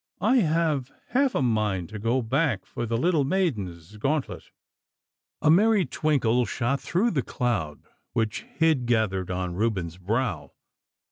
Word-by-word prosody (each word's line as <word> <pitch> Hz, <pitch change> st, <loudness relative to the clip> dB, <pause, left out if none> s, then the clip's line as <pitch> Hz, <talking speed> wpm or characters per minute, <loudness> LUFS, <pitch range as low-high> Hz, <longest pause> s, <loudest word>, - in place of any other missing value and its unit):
I 240 Hz, +5 st, +4 dB
have 155 Hz, -, +1 dB, 0.2 s
half 265 Hz, 0 st, +2 dB
a 135 Hz, -, +2 dB
mind 105 Hz, -7 st, 0 dB
to 110 Hz, 0 st, -7 dB
go 120 Hz, +4 st, 0 dB
back 130 Hz, -, 0 dB
for 120 Hz, -, -5 dB
the 115 Hz, +1 st, 0 dB
little 165 Hz, +2 st, +2 dB
maiden's 105 Hz, -, -2 dB
gauntlet.' 140 Hz, +6 st, -2 dB, 0.9 s
A 155 Hz, -, +6 dB
merry 205 Hz, +2 st, +4 dB
twinkle 125 Hz, -6 st, +1 dB
shot 125 Hz, +4 st, -1 dB
through 180 Hz, -, +1 dB
the 140 Hz, -, +1 dB
cloud 100 Hz, -14 st, -2 dB, 0.3 s
which 110 Hz, -3 st, -1 dB
hid 160 Hz, -7 st, 0 dB
gathered 105 Hz, -6 st, +1 dB
on 90 Hz, -1 st, -2 dB
Reuben's 95 Hz, -4 st, -1 dB
brow. 105 Hz, -1 st, -2 dB
120 Hz, 140 wpm, -26 LUFS, 105-155 Hz, 0.9 s, A